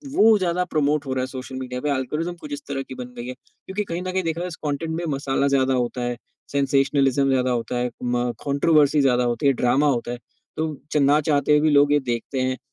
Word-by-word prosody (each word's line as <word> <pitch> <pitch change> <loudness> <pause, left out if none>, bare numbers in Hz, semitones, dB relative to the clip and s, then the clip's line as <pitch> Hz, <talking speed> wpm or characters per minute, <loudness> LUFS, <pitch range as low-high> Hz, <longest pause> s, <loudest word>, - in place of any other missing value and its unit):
वो 220 0 +6
ज़्यादा 180 -1 0
प्रमोट 150 -3 0
हो 130 - -2
रहा 130 - -1
है - - -3
सोशल 130 0 -7
मीडिया 125 -1 -5
पे 150 - -1
एल्गोरिदम 150 +6 -2
कुछ 295 - -7
इस 290 - -5
तरह 135 - -3
की 130 - -10
बन 125 -1 -8
गयी 120 - -6
है। 125 - -4
क्योंकि 190 +9 -7
कहीं 170 -3 -4
न 185 0 -3
कहीं 190 0 -1
देखा 165 0 -2
जाए 180 - -2
इस 170 - -7
कॉन्टेन्ट 155 +2 -2
में 175 - -3
मसाला 135 0 0
ज़्यादा 135 -1 +2
होता 125 0 -1
है 120 0 -2 0.3
सेंसेशनलिज़्म 135 -1 +2
ज़्यादा 130 -1 +2
होता 120 0 -2
है 125 0 0
म 120 0 0
कॉन्ट्रोवर्सी 145 +1 +3
ज़्यादा 125 -2 +3
होती 120 +3 0
है, 140 - +5
ड्रामा 130 +4 +2
होता 120 -3 0
है। 120 - -4 0.4
तो 155 -1 -2 0.2
च - - +1
ना 145 +1 +4
चाहते 145 0 +1
हुए 150 - +6
भी 155 - +3
लोग 145 -1 +5
ये 145 - +4
देखते 125 +1 -3
हैं। 130 0 -1
140 Hz, 245 wpm, -23 LUFS, 130-155 Hz, 0.4 s, वो